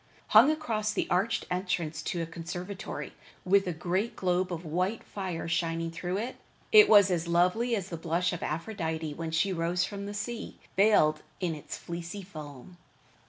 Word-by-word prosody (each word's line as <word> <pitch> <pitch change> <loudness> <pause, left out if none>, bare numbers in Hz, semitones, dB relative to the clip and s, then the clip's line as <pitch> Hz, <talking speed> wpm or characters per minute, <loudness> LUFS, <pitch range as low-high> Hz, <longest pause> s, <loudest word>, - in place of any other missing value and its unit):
Hung 225 +7 +8
across 225 -9 0
the - - 0
arched 200 +5 +1
entrance 175 -4 -1
to 170 0 -2
a - - -2
conservatory, 175 +4 -6 0.3
with 195 +1 +4
a - - 0
great 185 +7 -1
globe 180 0 0
of 170 0 -4
white 185 +7 -1
fire 185 -5 -4
shining 165 0 -1
through 175 +3 -3
it, 235 +5 -4 0.3
it 430 -1 +9
was 185 -5 +5
lovely 185 +8 +2
as 195 -3 -4
the 170 - -4
blush 170 +2 0
of 175 - -5
Aphrodite 160 -3 -3
when 165 +2 -4
she 175 +4 +1
rose 175 +1 0
from 200 -1 -6
the 205 - -6
sea, 230 +3 -5 0.2
veiled 170 -7 +4 0.2
in 175 -3 -1
its 150 - -7
fleecy 170 +3 -6
foam. 155 -2 -10
180 Hz, 165 wpm, -29 LUFS, 165-200 Hz, 0.3 s, it